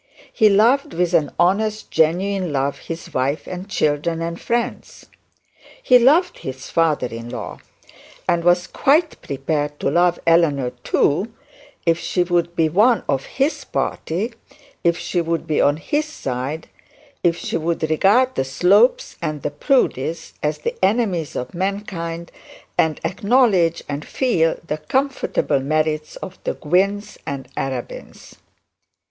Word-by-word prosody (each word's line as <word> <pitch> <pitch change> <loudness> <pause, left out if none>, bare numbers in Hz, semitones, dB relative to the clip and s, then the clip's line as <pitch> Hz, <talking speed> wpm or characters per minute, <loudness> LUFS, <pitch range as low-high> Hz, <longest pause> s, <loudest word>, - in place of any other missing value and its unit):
He 220 -3 +5
loved 225 +3 +3
with 175 0 0
an 155 -5 +2
honest 210 +5 +1
genuine 180 +3 +1
love 140 0 -1
his 165 0 -8
wife 135 +4 -1
and 185 +2 -7
children 155 -1 0
and 170 +1 -4
friends. 235 +1 -3 0.8
He 250 -1 +6
loved 310 +9 +4
his 130 0 -7
father 160 -5 +2
in 115 0 -7
law; - - -6 0.7
and 170 - +2
he - - -9
was 175 0 +4
quite 310 - +1
prepared 145 +1 -2
to - - 0
love 175 +2 +3
Eleanor 150 -7 +3
too, 190 +10 +1 0.5
if 165 -1 +3
she 180 - 0
would 175 -1 0
be 165 -1 +3
one 215 +9 +3
of 135 -1 0
his 275 +4 -1
party, 200 +9 -2 0.5
if 170 -1 +3
she 175 - -1
would 165 0 -2
be 155 -2 +1
on 145 +1 +3
his 295 - -1
side, 145 - -4 0.6
if 170 -1 +3
she - - -3
would 165 0 -1
regard 210 +11 +3
the - - 0
Slopes 190 - +3
and 155 -4 -3
the - - -1
Proudies 160 - 0
as 150 0 -1
the 150 - -3
enemies 190 -6 +1
of 125 - -4
mankind, 175 -3 -4 0.4
and 155 -2 +1
acknowledge 195 -3 +2
and 145 +1 -4
feel 170 -12 +1
the 155 -1 -3
comfortable 265 - 0
merits 155 +2 -1
of 185 -1 -9
the - - -2
Gwynnes 195 +6 0
and 135 -2 -4
Arabins. 130 -3 -6
170 Hz, 140 wpm, -21 LUFS, 150-200 Hz, 0.8 s, He